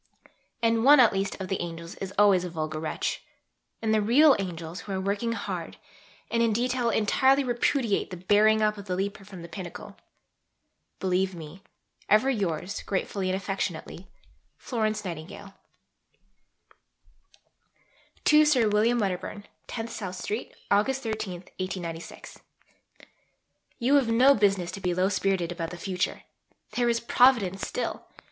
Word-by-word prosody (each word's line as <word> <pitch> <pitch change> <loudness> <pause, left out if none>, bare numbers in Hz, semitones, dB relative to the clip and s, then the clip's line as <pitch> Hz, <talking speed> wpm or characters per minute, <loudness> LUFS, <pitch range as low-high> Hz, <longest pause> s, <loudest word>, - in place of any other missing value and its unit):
And 230 0 +2
one 290 +2 +8
at 235 -4 +6
least 195 +1 -2
of 190 - -4
the 190 - -2
"angels" 170 -1 -6
is 195 -1 -5
always 200 -3 +5
a 180 - -4
vulgar 155 -2 -4
wretch. 155 0 -3 0.6
And 220 -1 +2
the 215 - +3
real 270 +7 +6
"angels" 170 -2 -5
who 205 - -8
are 190 - -1
working 200 +4 -1
hard, - - -5 0.5
and 230 - +1
in 230 -2 +3
detail 245 +1 0
entirely 265 +6 +3
repudiate 240 -2 0
the 180 - -7
"bearing 210 +4 +3
up" 210 -1 +1
of 200 - -9
the 185 -2 -2
leaper 195 +1 -3
from 190 -3 -11
the - - -8
pinnacle.... 180 +4 -8 1.0
Believe 185 0 0
me, 165 +3 -10 0.5
ever 215 +6 +4
yours 190 -4 -2
gratefully 195 -1 -2
and 185 - 0
affectionately, 190 -2 -4 0.5
F. - - -12
N. 200 -4 -3 2.7
(To 305 0 +7
Sir 255 -8 +3
William 220 +4 +3
Wedderburn.) 200 0 -3 0.2
10 225 -1 -4
SOUTH 190 -5 -6
STREET, 210 +5 -5 0.2
August 255 +7 +2
13.... 210 -5 -4 2.3
You 260 +4 +2
have 260 -5 +1
no 255 +5 +6
business 195 -6 +1
to 195 - -8
be 180 -2 -1
low 185 +2 +2
spirited 190 -3 0
about 170 -2 -4
the 175 - -8
future. 185 0 -3 0.5
There 240 -1 +1
is 235 0 +1
Providence 235 -6 +3
still. - - -4
200 Hz, 140 wpm, -27 LUFS, 185-230 Hz, 2.7 s, one